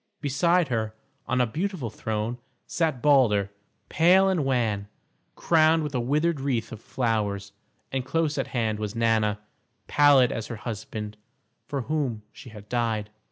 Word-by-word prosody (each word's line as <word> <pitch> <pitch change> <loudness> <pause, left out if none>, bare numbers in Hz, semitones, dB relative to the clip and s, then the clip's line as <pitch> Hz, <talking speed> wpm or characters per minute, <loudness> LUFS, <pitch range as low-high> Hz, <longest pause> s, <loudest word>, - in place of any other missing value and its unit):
Beside 165 +4 +2
her, 110 -2 -2 0.3
on 125 - 0
a 125 - +4
beautiful 160 - -3
throne, 110 +3 -3 0.3
sat 155 -7 -1
Balder, 115 -9 +4 0.4
pale 185 +4 +4
and 180 -6 +1
wan, 115 -7 0 0.5
crowned 160 -1 +3
with 150 -1 -4
a 125 - 0
withered 150 +6 +1
wreath 130 -5 -2
of 115 - -8
flowers, 105 -6 -2 0.4
and 130 -1 -1
close 155 +2 0
at - - -1
hand 110 -4 -1
was 105 0 -4
Nanna, 110 -2 +2 0.5
pallid 145 -4 +5
as 110 -1 -4
her 120 - -5
husband, 105 -1 -6 0.5
for 140 -2 -2
whom 135 -7 -2
she 130 - -12
had 105 -2 -12
died. 110 -3 -1
125 Hz, 150 wpm, -26 LUFS, 110-145 Hz, 0.5 s, pallid